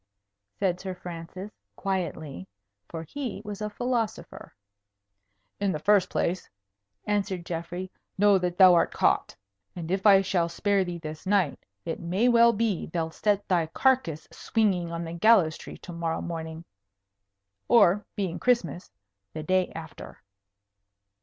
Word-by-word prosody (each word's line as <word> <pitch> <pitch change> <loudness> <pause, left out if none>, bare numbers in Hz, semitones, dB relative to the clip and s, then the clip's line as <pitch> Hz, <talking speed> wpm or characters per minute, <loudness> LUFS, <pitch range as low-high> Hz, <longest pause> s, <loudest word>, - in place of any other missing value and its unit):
said 180 -2 0
Sir 190 -1 -5
Francis, 180 +3 -8 0.2
quietly. 160 - -4 0.4
For 165 -1 -6
he 255 - -5
was 210 0 -6
a 210 - -2
philosopher. 235 0 -3 1.0
"In 200 -1 +1
the 155 - -2
first 195 +3 +3
place," 180 +1 -1 0.6
answered 195 -4 -1
Geoffrey, 175 +2 -5 0.3
"know 200 0 +5
that 180 -1 -2
thou 185 -2 +8
art 170 - +3
caught. - - +1 0.4
And 170 -1 -5
if 195 +2 +2
I 195 -1 +8
shall 175 -3 0
spare 200 +3 +1
thee 175 -1 -5
this 155 +2 -8
night, 190 -7 +1 0.2
it 165 - -3
may 185 +8 +1
well 235 -1 +6
be 220 -4 -1
they'll 165 -1 -3
set 205 +2 0
thy 170 -4 +2
carcase 170 - +1
swinging 190 -7 0
on 170 0 -4
the 165 0 -6
gallows 170 -4 +4
tree - - -10
to 175 - -10
morrow 165 -1 -2
morning, 160 -1 -6 1.0
or, 205 -3 +5
being 190 -5 -2
Christmas, 230 - 0 0.4
the 155 - -5
day 185 +3 +1
after." 160 -2 -10
185 Hz, 140 wpm, -27 LUFS, 170-205 Hz, 1.0 s, thou